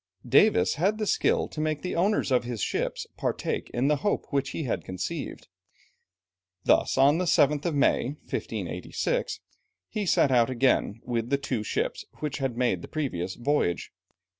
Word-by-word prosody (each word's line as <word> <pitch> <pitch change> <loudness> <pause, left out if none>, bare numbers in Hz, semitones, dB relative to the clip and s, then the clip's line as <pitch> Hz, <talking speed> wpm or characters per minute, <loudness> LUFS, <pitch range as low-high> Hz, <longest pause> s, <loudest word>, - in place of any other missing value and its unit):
Davis 90 +1 +5
had 200 +4 +2
the 215 - -1
skill - - +2
to 155 - -5
make 155 -1 -1
the 180 - -3
owners 195 -3 +1
of 125 -1 +3
his 120 -2 -5
ships - - -2
partake - - -2
in 125 +3 0
the 150 0 +3
hope 205 +8 -1
which 140 -1 0
he 160 - -4
had 125 - -2
conceived. 95 -1 -5 1.2
Thus - - +3
on 140 +5 +5
the 180 - 0
7th 150 -3 +3
of 170 -4 0
May 140 - +3 0.2
(1586), - - -3 0.5
he 210 -3 -3
set 140 - +4
out 120 -2 +4
again 125 -3 +1
with 120 -1 -2
the 140 - +2
two 130 -5 -2
ships 105 - -2
which 150 -2 -4
had 130 -4 -2
made 120 -8 +1
the - - -8
previous 95 - -3
voyage. 120 -9 0
140 Hz, 165 wpm, -27 LUFS, 120-155 Hz, 1.2 s, Davis